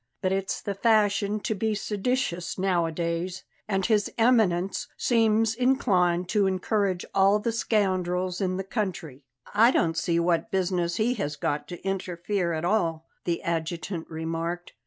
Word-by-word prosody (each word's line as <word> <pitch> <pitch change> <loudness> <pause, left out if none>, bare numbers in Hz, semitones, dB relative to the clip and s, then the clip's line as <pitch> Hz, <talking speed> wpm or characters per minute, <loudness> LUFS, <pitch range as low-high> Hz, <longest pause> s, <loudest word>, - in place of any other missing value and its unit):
But 185 - +1
it's 195 0 -1
the 200 - -2
fashion 210 -1 +2
to 220 - -1
be 215 +1 -1
seditious 205 -4 -2
nowadays; 175 -1 -1 0.2
and 195 -2 0
His 210 -3 +2
Eminence 205 -6 +2
seems 225 -2 +2
inclined 190 -9 +2
to 205 -1 +2
encourage 190 0 0
all 195 +1 +4
the 225 +2 -1
scoundrels 185 -5 0
in 185 -1 0
the 190 - -2
country." 180 - -4 0.3
"I 225 +3 +6
don't 165 -10 +1
see 170 +1 +1
what 170 +5 +1
business 180 -3 0
he 230 +3 +1
has 145 +1 -2
got 145 0 -2
to 175 - -9
interfere 185 -1 -2
at 160 0 -2
all," 170 -5 0 0.2
the 170 -1 -1
adjutant 170 0 -3
remarked. 165 +2 -4
185 Hz, 145 wpm, -26 LUFS, 170-210 Hz, 0.3 s, I